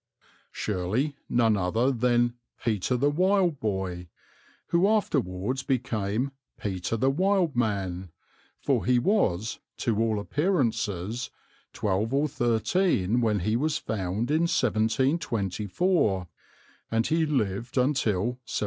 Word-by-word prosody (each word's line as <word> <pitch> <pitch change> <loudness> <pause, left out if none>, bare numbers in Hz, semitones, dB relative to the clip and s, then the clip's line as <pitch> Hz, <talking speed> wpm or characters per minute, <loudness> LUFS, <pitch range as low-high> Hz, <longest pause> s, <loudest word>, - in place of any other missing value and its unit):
Surely 110 +9 -1
none 115 -3 +3
other 110 +7 +1
than 120 -1 +2 0.3
"Peter 115 +2 +1
the 140 +4 +2
Wild 180 -1 +2
Boy," 95 -4 -3 0.6
who 175 +3 +3
afterwards 130 - 0
became 120 -2 -1 0.3
"Peter 95 +2 -2
the 130 +4 +2
Wild 185 -1 +1
Man," 95 -6 -1 0.5
for - - +1
he 125 0 +3
was, 115 - +1 0.2
to 110 -3 0
all 110 -2 +1
appearances, 115 - -1 0.4
twelve 105 +5 -1
or 145 +2 +2
thirteen 120 - +1
when 105 -4 +1
he 110 +5 0
was 150 +6 +1
found 105 +3 -2
in 165 +2 +2
1724, 110 - +1 0.6
and 115 +1 +1
he 160 +1 +2
lived 120 -3 -1
until 125 -8 +2
1785. 120 +4 -2
120 Hz, 115 wpm, -27 LUFS, 100-140 Hz, 0.6 s, none